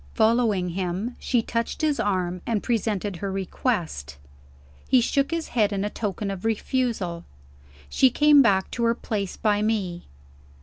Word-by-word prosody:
Following 220 Hz, -5 st, +2 dB
him, 185 Hz, +6 st, -3 dB
she 240 Hz, -3 st, +1 dB
touched 230 Hz, +6 st, -3 dB
his 300 Hz, -2 st, +1 dB
arm, 180 Hz, -3 st, -1 dB
and 220 Hz, -3 st, 0 dB
presented 210 Hz, -5 st, -1 dB
her 195 Hz, +2 st, -4 dB
request. 175 Hz, -, -2 dB, 0.7 s
He 255 Hz, -, +6 dB
shook 275 Hz, +3 st, +1 dB
his 330 Hz, -1 st, -3 dB
head 215 Hz, -3 st, +2 dB
in 200 Hz, 0 st, -1 dB
token 205 Hz, -1 st, -3 dB
of 190 Hz, -1 st, -6 dB
refusal. 225 Hz, -6 st, -1 dB, 0.6 s
She 260 Hz, -, +4 dB
came 295 Hz, +2 st, +6 dB
back 195 Hz, -6 st, +2 dB
to 235 Hz, -, -2 dB
her 230 Hz, 0 st, +2 dB
place 205 Hz, -5 st, -4 dB
by 210 Hz, -2 st, +1 dB
me. 200 Hz, -5 st, -2 dB
210 Hz, 145 wpm, -25 LUFS, 190-235 Hz, 0.7 s, He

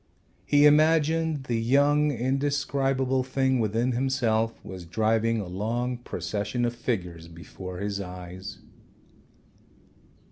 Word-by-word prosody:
He 145 Hz, 0 st, +5 dB
imagined 155 Hz, 0 st, +3 dB
the 120 Hz, -3 st, -1 dB
young 145 Hz, +5 st, +3 dB
indescribable 135 Hz, 0 st, 0 dB
thing 130 Hz, 0 st, 0 dB
within 115 Hz, +3 st, 0 dB
himself 120 Hz, -3 st, 0 dB
was 95 Hz, -2 st, -8 dB
driving 110 Hz, +5 st, +1 dB
a 105 Hz, -, -3 dB
long 115 Hz, +7 st, -2 dB
procession 105 Hz, +3 st, -3 dB
of 120 Hz, -, -1 dB
figures 90 Hz, -9 st, -3 dB
before 90 Hz, +2 st, -9 dB
his 100 Hz, +1 st, -3 dB
eyes. 90 Hz, +1 st, -8 dB
120 Hz, 105 wpm, -26 LUFS, 100-135 Hz, -, He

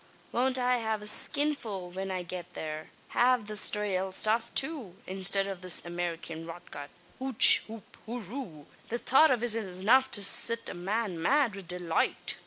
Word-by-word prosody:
Won't 255 Hz, +2 st, +1 dB
I 250 Hz, 0 st, +1 dB
have 220 Hz, -2 st, -3 dB
a -, -, -7 dB
skinful 215 Hz, -6 st, +1 dB
when 190 Hz, +2 st, -6 dB
I 185 Hz, -1 st, -4 dB
get 175 Hz, 0 st, -9 dB
thare 155 Hz, 0 st, -7 dB, 0.3 s
av 245 Hz, -2 st, +2 dB
the 215 Hz, -, -7 dB, 0.2 s
raal 190 Hz, -2 st, -2 dB
stuff 225 Hz, +4 st, +1 dB
too, 270 Hz, -, 0 dB
instid 195 Hz, +1 st, +1 dB
of 195 Hz, -2 st, -7 dB
this 185 Hz, -2 st, +2 dB
Amerikyan 170 Hz, -1 st, -6 dB
rotgut! 165 Hz, -4 st, -10 dB, 0.3 s
Hooch 260 Hz, -3 st, +6 dB
hoop 220 Hz, -1 st, -13 dB
horoo! 220 Hz, -, -8 dB, 0.2 s
The 235 Hz, -, -2 dB
thought 270 Hz, +6 st, +4 dB
av 245 Hz, -3 st, 0 dB
it's 240 Hz, -2 st, +5 dB
enough 220 Hz, +5 st, +1 dB
to 205 Hz, -, 0 dB
sit 230 Hz, +3 st, +2 dB
a -, -, -6 dB
man 190 Hz, 0 st, -4 dB
mad 270 Hz, -, +2 dB
wid 195 Hz, -3 st, -11 dB
deloight. 175 Hz, -2 st, -1 dB
205 Hz, 165 wpm, -28 LUFS, 180-240 Hz, 0.3 s, Hooch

